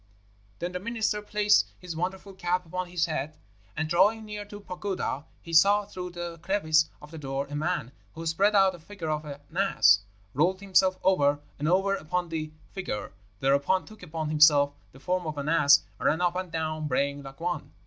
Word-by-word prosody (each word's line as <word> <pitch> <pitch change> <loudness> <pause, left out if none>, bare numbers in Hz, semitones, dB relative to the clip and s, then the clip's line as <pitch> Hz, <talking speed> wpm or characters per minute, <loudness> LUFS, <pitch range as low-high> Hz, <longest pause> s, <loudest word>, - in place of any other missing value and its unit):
"Then 175 +1 -3
the 180 - -4
minister 220 0 -1
placed 210 0 +3
his 180 -3 -7
wonderful 190 +3 -4
cap 180 -1 -1
upon 180 +2 -4
his 175 -2 0
head, 155 -1 -4 0.4
and, 160 +1 0
drawing 205 +7 +3
near 210 -1 -6
to 205 0 -9
a - - -11
pagoda, 180 -6 -4 0.2
he 165 - -9
saw, 200 +5 +5
through 180 -2 -6
the 175 -1 -6
crevice 160 -4 +2
of 150 - -12
the 160 - -8
door, 135 -1 -3
a - - -4
man, 155 -4 -1 0.2
who 165 +1 -6
spread 195 +6 +2
out 195 -1 +5
a 175 - -11
figure 165 -1 -6
of 155 0 -2
an 145 -1 -7 0.2
ass, 185 - +5 0.3
rolled 180 +7 +2
himself 190 -1 +3
over 145 -6 +3 0.2
and 150 - -1
over 195 +3 +3
upon 180 0 -2
the 155 -1 -4 0.2
figure, 180 - -5 0.3
thereupon 140 +7 +2
took 215 -1 -14
upon 160 -3 -4
himself 150 -2 +5 0.2
the 135 - -16
form 180 +3 -1
of 155 -1 -4
an 140 +1 -3
ass, 150 -3 +5 0.2
and - - 0
ran 160 - +2
up 175 0 +1
and 185 -2 -4
down 155 -1 -2
braying 140 +1 0
like 135 +1 -11
one. 175 -2 -3
170 Hz, 200 wpm, -27 LUFS, 155-190 Hz, 0.4 s, saw